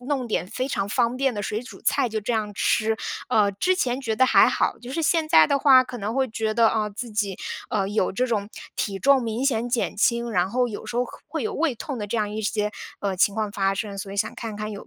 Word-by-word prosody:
弄 260 -1 -2
点 195 -5 -1
非 255 +6 -3
常 200 -7 -2
方 235 +3 +1
便 265 -2 0
的 205 - -3
水 215 +1 -2
煮 250 - -11
菜 245 - +2
就 220 - -2
这 215 +3 -2
样 215 -2 -1
吃。 220 +2 +1 0.3
呃， 205 -2 +3
之 365 - +1
前 255 -3 0
觉 225 -5 -2
得 260 - +5
还 - - +6
好， - - 0
就 245 +1 -9
是 325 +4 -2
现 320 0 +2
在 160 - +7
的 280 - +2
话， 260 -2 +6
可 245 -1 -8
能 215 +2 -3
会 265 0 +2
觉 220 0 -2
得， 230 -1 +5
呃， 215 -1 0
自 220 +3 -7
己， 205 -3 -1 0.3
呃， 195 -2 0
有 205 -1 0
这 250 +6 0
种 210 -4 -1 0.3
体 195 -2 -2
重 275 +1 +4
明 230 +3 -2
显 240 -3 +1
减 240 -1 -1
轻， 235 +3 +1
然 180 -2 +1
后 250 +3 +1
有 210 - -7
时 235 - -5
候 245 - +2
和 - - -12
会 - - -4
有 435 -1 -2
胃 320 - 0
痛 260 +2 -6
的 205 - -4
这 230 - -2
样 210 -1 0
一 215 +1 -4
些， 210 0 -1 0.3
呃， 200 -2 -1
情 200 +2 +2
况 215 -2 -2
发 195 -1 +1
生， 200 -1 -4
所 195 0 -6
以 200 - -7
想 215 +2 -1
看 220 -3 -6
看 215 0 -4
有 200 - -9
220 Hz, 285 characters per minute, -24 LUFS, 205-250 Hz, 0.3 s, 在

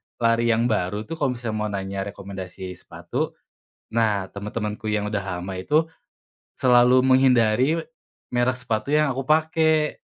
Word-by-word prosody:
lari 115 0 +2
yang 115 0 +3
baru 105 +1 -1
tuh, 165 +9 -7
kalau 135 -4 0
misalnya 115 -3 -4
mau 105 - -1
nanya 95 -1 -4
rekomendasi 95 -2 -7
sepatu, 90 - -5 0.6
nah, 105 -4 +1
teman-temanku 105 +1 -4
yang 105 0 0
udah 105 -2 -2 0.2
lama 95 +2 -5
itu 150 - +1 0.7
selalu 125 0 +5
menghindari 130 +1 +4 0.6
merek 125 +1 +1
sepatu 115 -1 -3
yang 150 -2 +3
aku 135 - -3
pakai. 160 0 +2
115 Hz, 135 wpm, -23 LUFS, 100-130 Hz, 0.7 s, selalu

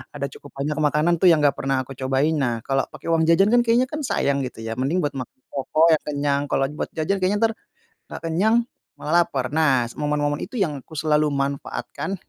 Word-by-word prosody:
ada 140 - -5
cukup 145 - -14
banyak 150 +3 -2
makanan 155 +3 +2
tuh 185 - +5
yang 160 -4 +5
enggak 145 - +5
pernah 135 -1 0
aku 130 0 -12
cobain. 135 +4 +1
Nah, 120 -4 -1
kalau 135 0 0
pakai 155 +2 -6
uang 160 -1 +2
jajan 195 +6 +4
kan 245 - +5
kayaknya 240 +2 +2
kan 305 - -3
sayang 140 0 +1
gitu 125 -4 -5
ya, 115 - -4
mending 155 +6 0
buat 145 - 0
mak 125 - -5 0.2
pokoknya 155 +3 +3
kenyang 140 -1 0
kalau 135 - +1 0.2
buat - - -1
jajan 165 +5 0
kayaknya 200 +4 +1
entar, 225 - +4 0.6
enggak - - -8
kenyang 185 +8 +2 0.4
malah 170 +3 +2
laper. 130 -2 -3
Nah, 145 -5 +3
s 120 - -8
momen 150 0 0
momen 145 +1 0
itu - - -7
yang 160 - -1
aku 160 +4 -14
selalu 150 0 +2
manfaatkan. 140 +7 -3
150 Hz, 215 wpm, -23 LUFS, 140-170 Hz, 0.6 s, tuh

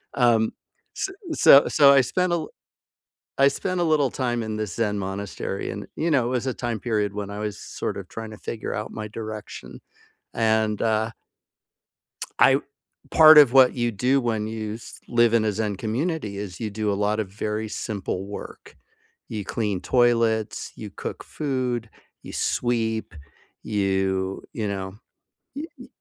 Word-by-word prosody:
Um, 115 -3 +3 0.4
s - - -1 0.2
so 140 - +7
so 140 -2 +7
I 135 - +6
spent 180 +7 0
a - - +3
li 155 - -4 0.9
I 140 - +7
spent 185 +6 -2
a 175 - +2
little 150 -5 +2
time 120 -3 -1
in 110 -1 -4
this 105 -4 -4
Zen 105 -3 0
monastery, 95 +1 -4
and, - - -6
you 165 +2 0
know, 135 -6 +3
it - - -1
was 125 0 -1
a - - 0
time 120 -3 -3
period 105 -3 -1
when 100 -1 -4
I 100 - -6
was 105 -1 -3
sort - - -4
of 100 -2 -7
trying 110 -1 -7
to - - -9
figure 110 +1 -5
out 105 - -4
my 110 -1 -5
direction. 110 -1 -8 0.5
And, 110 -2 +1
uh 110 0 +1 1.3
I 135 +1 +6 0.5
part 155 -1 +9
of 140 -5 +8
what 130 -1 +6
you 120 -1 0
do 125 +6 +2
when 110 -3 -1
you 110 -1 -4
s 115 - -10
live 120 -1 +4
in 110 -1 +3
a 105 - +1
Zen 105 -1 -2
community 115 - -2
is 100 -1 -6
you 110 -2 -3
do 105 0 -1
a - - 0
lot 105 +2 0
of 105 - -3
very 105 +2 -3
simple 100 -3 -4
work. 100 - -9 0.5
You 105 -3 -4
clean 105 -4 -2
toilets, 115 -3 +1
you - - -8
cook - - -7
food, 130 -5 -2 0.3
you - - -9
sweep. 115 -4 -1 0.5
You 95 -2 -1
you 110 -3 -3
know? 95 -1 -4 0.6
Y 290 - -4
y 250 - -11
110 Hz, 170 wpm, -24 LUFS, 105-125 Hz, 1.3 s, part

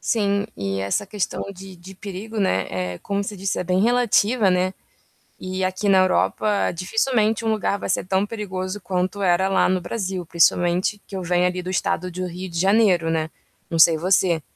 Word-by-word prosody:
Sim, 200 -2 0
e 95 0 -3
essa 100 - -1
questão 200 -1 -3
de 190 0 -11
de 185 +3 -12
perigo, 205 +3 -6
né, 95 - +1 0.3
eh, - - -10
como 200 0 -2
você 205 +1 -6
disse 195 +1 -2
é - - -2
bem 185 +1 +1
relativa, 235 -2 +3
né. 185 +1 +1 0.7
E 185 0 -4
aqui 185 +2 -1
na 195 -1 +5
Europa 200 +2 +1
dificilmente 220 +5 0
um 220 - +2
lugar 215 -2 0
vai - - -5
ser 190 - +1
tão 190 +2 +1
perigoso 200 -2 -5
quanto 185 +2 -2
era 185 0 +3
lá 195 - +2
no 185 0 +1
Brasil, 185 -1 -4
principalmente 175 +4 +2
que 195 - -8
eu 190 - -3
venho, 180 0 +1
ali, 180 0 -1
do 180 - -6
estado 185 -1 -1
do 185 +1 -4
Rio 180 +2 -7
de 170 -1 -4
Janeiro, 190 -3 +3
né. 160 -1 -1 0.4
Não 165 - -2
sei 165 0 +7
você, 180 -1 +2
185 Hz, 195 wpm, -22 LUFS, 180-200 Hz, 0.7 s, sei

